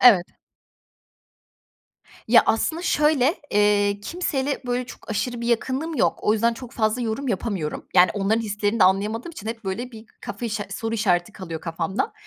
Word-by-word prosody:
Evet. 200 -8 +7 2.0
Ya, - - +7
aslında, 320 +9 +1
şöyle, 300 -3 +3 0.2
eee, 205 -1 +3
kimseyle, 285 - -2
böyle, 245 0 -1
çok - - -11
aşırı 240 +3 -2
bir 235 - -3
yakınlığım 260 +7 0
yok, - - +2
o 210 - +3
yüzden 230 +2 +2
çok 245 0 -10
fazla 220 +2 0
yorum 235 +4 -2
yapamıyorum. 195 -7 -3
Yani, 180 -1 +7
onların 205 +2 +1
hislerini 210 0 -1
de - - +8
anlayamadığım 210 - +1
için 220 -9 -9
hep, 225 0 -5
böyle, 235 +7 -4
bir 220 -1 -11 0.2
kafa 235 +4 -5
işa 210 -1 -3
soru 225 +3 -3
işareti 190 -3 +1
kalıyor 165 -6 -7
kafamda. 170 +4 -2
220 Hz, 160 wpm, -23 LUFS, 205-245 Hz, 2.0 s, de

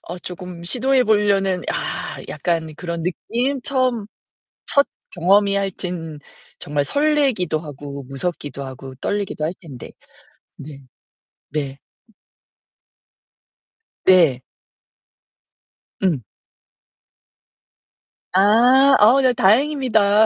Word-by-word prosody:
어 175 +2 -8
조금 180 -1 -8
시도해 255 +6 +2
보려는 200 -4 +2
아 - - -4
약간 160 +1 -2
그런 170 0 -5
느낌? 245 +10 -2
처음 255 -6 0 0.6
첫 280 0 +3 0.3
경험이 200 +3 +3
하여튼 180 -5 -4 0.4
정말 145 0 -1
설레기도 275 - +1
하고, 145 -2 -8
무섭기도 140 0 -4
하고, 130 0 -9
떨리기도 200 -6 -2
할 165 - -2
텐데. 135 -8 -11 0.7
네. 145 -1 -10 0.7
네. 140 -2 -4 2.2
네. 165 -9 +5 1.6
음. 160 - +1 2.1
아. 245 +8 +5
어 240 +6 +6
네 255 -1 +3
다행입니다. 220 -2 +3
185 Hz, 170 characters per minute, -20 LUFS, 155-235 Hz, 2.2 s, 어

